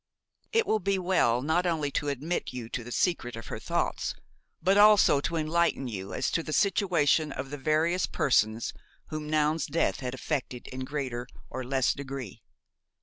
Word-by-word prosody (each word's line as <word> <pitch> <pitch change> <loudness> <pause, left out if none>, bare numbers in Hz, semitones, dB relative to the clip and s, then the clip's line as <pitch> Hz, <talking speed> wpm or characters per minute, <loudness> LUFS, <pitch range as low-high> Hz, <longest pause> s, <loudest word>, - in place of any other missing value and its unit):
It 455 0 +3
will 220 - +2
be 195 +1 0
well 170 -10 +2
not 165 +5 +1
only 155 -4 0
to 145 - -1
admit 145 +6 -2
you 120 -3 -6
to 120 - -4
the 120 - -9
secret 120 -6 0
of 115 - -8
her - - -4
thoughts, - - -1 0.4
but 190 +1 +3
also 205 -8 +6
to 170 - -2
enlighten 160 -3 +1
you 100 -4 -5
as 135 - -1
to 165 - +1
the 155 - -6
situation 170 -7 +2
of 135 +1 -6
the 145 - -4
various 160 +5 +1
persons 110 -4 +1 0.4
whom 155 -1 -5
Noun's 155 0 +1
death 165 +3 0
had 130 -1 -4
affected 130 -3 -3
in 130 0 -5
greater 130 -4 -4 0.2
or 130 - -4
less 130 0 +1
degree. 135 -6 -7
145 Hz, 175 wpm, -28 LUFS, 130-170 Hz, 0.4 s, also